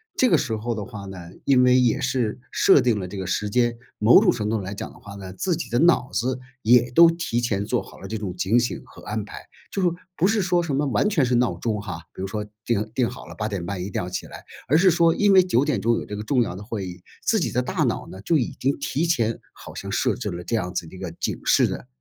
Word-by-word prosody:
这 255 - +3
个 - - +5
时 110 - -1
候 115 +2 -3
的 105 -2 -4
话 100 -1 -8
呢， 95 -1 -8 0.3
因 130 -2 +4
为 125 0 +5
也 120 -3 +2
是 130 -4 -1
设 140 - +5
定 120 -4 +1
了 95 - -4
这 100 - -8
个 95 - -4
时 105 +3 -1
间， 120 +1 +1 0.2
某 110 +3 +7
种 - - +4
程 110 -3 -3
度 110 +1 0
上 100 - -4
来 100 +2 -5
讲 - - -7
的 - - -17
话 100 0 -11
呢， 95 -2 -8
自 175 - -1
己 - - -5
的 120 - +2
脑 165 -6 +3
子 130 +2 -1 0.2
也 120 +1 +4
都 165 +6 +8
提 165 -8 -1
前 100 -4 -1
做 - - 0
好 - - -14
了 - - -8
这 110 - -4
种 95 -4 -5
警 105 +7 +3
醒 120 - -2
和 - - -15
安 105 0 -4
排。 105 - -11 0.2
就 195 - -2
说 175 -2 +2 0.2
不 170 - +1
是 210 +2 +2
说 175 -1 +1
什 160 -4 -3
么 145 +2 +1
完 145 +9 +1
全 160 -10 +2
是 125 0 +1
闹 125 0 +1
钟 110 -3 -2
哈， 90 -5 -6
比 - - -8
如 95 - -2
说 105 +2 -4 0.2
定 110 -2 -1
定 125 -3 +2
好 125 - -10
了， - - -11
8 110 0 -3
点 95 -5 -4
半 95 -1 -4
一 95 - -4
定 - - -1
要 90 - -5
起 90 - -4
来， - - -11 0.2
而 150 - +5
是 185 +3 +5
说 170 -1 +4
因 205 +2 +3
为 190 -1 +7
9 145 -6 +2
点 125 -10 0
钟 115 +1 +2
有 - - -4
这 105 - -6
个 105 - -5
重 125 +3 +2
要 95 -5 -5
的 100 - -8
会 105 -4 -4
议， 90 0 -10 0.2
自 220 - +2
己 - - -1
的 125 - +1
大 125 - -1
脑 - - -1
呢， 95 - -10
就 160 +9 +2
已 125 - -2
经 135 +2 0
提 145 +3 -1
前 115 -9 0
好 - - -12
像 - - -6
设 - - +1
置 - - -4
了 85 0 -6
这 115 - -1
样 90 -5 -2
子 85 -3 -3
的 95 - -12
一 - - -10
个 95 -3 -5
警 85 - -3
示 - - +4
的 - - -6
115 Hz, 310 characters per minute, -24 LUFS, 100-140 Hz, 0.3 s, 都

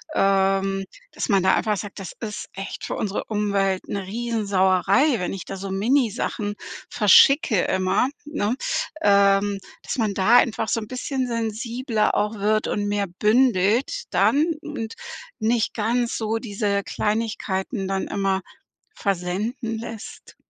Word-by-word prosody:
ähm, 195 0 +2 0.3
dass - - -3
man 195 -4 +3
da 190 - +4
einfach 215 -2 +1
sagt: 205 0 -7
„Das 190 -4 -7
ist 215 -3 -5
echt 195 +1 -6
für - - -3
unsere 205 -1 -2
Umwelt 200 -3 0
'ne 200 -1 -3
Riesensauerei, 210 - +2
wenn 180 - -2
ich 195 - -6
da 195 - -7
so 195 +1 -6
Minisachen 215 -1 0 0.3
verschicke 230 - +5
immer, 190 +5 +1 0.2
ne?“ 290 -7 -1 0.5
ähm, 200 -1 +4 0.2
dass - - -4
man 220 -4 0
da 205 +5 +5
einfach 225 -2 +2
so 230 - +1
'n 215 - -7
bisschen 255 +2 -3
sensibler 230 0 -1
auch 210 +1 0
wird 215 +1 +1
und 205 - -1
mehr 205 -1 0
bündelt 235 - +2
dann 295 +3 +3 0.2
und 230 -8 -5 0.5
nicht 225 0 +1
ganz 235 +2 0
so 220 0 -1
diese 205 -3 -1
Kleinigkeiten 210 -1 -2
dann 195 0 -2
immer 195 -1 0 0.6
versenden 205 +5 -2
lässt. 225 -1 -9
210 Hz, 140 wpm, -23 LUFS, 195-230 Hz, 0.6 s, verschicke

